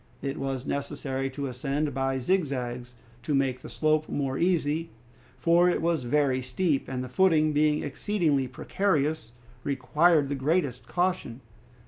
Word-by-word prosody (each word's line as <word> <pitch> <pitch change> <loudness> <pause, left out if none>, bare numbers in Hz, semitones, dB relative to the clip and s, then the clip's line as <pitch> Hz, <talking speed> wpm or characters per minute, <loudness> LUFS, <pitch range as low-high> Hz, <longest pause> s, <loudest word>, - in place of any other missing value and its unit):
It 140 0 -3
was 135 -2 -3
necessary 140 -1 -3
to 140 +1 -5
ascend 140 +3 -2
by 135 0 0
zigzags 125 -6 -2 0.3
to 145 +4 -1
make 130 -2 0
the - - -9
slope 155 0 +1
more 135 -2 -1
easy, 165 -1 +1 0.5
for 170 +1 +4
it - - +1
was 165 -5 0
very 130 0 +2
steep, 140 +4 -1
and 130 -1 -3
the - - -5
footing 155 +1 +3
being 150 0 +2
exceedingly 150 -3 0
precarious 150 - -1 0.3
required 145 +3 +3
the 140 - -2
greatest 135 -3 0
caution. 175 -9 -1
140 Hz, 140 wpm, -27 LUFS, 130-160 Hz, 0.5 s, for